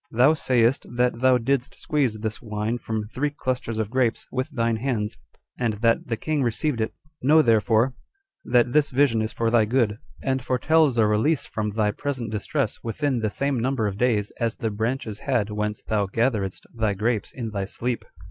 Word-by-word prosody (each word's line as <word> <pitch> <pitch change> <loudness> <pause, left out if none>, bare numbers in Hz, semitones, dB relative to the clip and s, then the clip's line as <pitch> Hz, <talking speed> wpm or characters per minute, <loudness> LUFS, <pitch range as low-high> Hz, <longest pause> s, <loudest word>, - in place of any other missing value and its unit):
"Thou 125 +6 +5
sayest 125 -3 +2
that 125 -1 +1
thou 130 0 +5
didst 130 +2 -1
squeeze 135 -8 0
this 110 0 -4
wine 110 +1 -2
from 110 -2 -3
three 130 +7 -2
clusters 130 -5 -3
of 110 -1 -2
grapes 125 -3 +1
with 130 +2 -2
thine 115 -5 0
hands, 110 -4 -2 0.4
and 120 -3 +1
that 115 +2 +1
the 115 - -1
king 155 +4 -1
received 120 +1 0
it: 110 - -3 0.2
know, 155 +4 +5
therefore, 115 +1 +3 0.5
that 120 0 +2
this 150 -1 +4
vision 125 -4 +3
is 110 +1 -2
for 115 -1 0
thy 115 -2 +4
good, 110 -2 +1 0.2
and 130 -1 0
foretells 140 +1 +3
a 110 - +5
release 110 +9 +2
from 105 -1 -3
thy 105 0 +1
present 130 -2 -4
distress 110 +3 -2
within 130 +3 -1
the 110 -1 0
same 140 +3 -1
number 125 -1 0
of 100 -2 -1
days 110 -5 +1
as 115 -2 0
the 110 - -2
branches 110 0 -2
had 120 -6 0
whence 105 0 -3
thou 105 -2 0
gatheredst 105 -3 -1
thy 110 -3 0
grapes 110 +2 -1
in 115 -4 -5
thy 100 -2 -2
sleep. 120 +3 -3
115 Hz, 185 wpm, -24 LUFS, 110-130 Hz, 0.5 s, Thou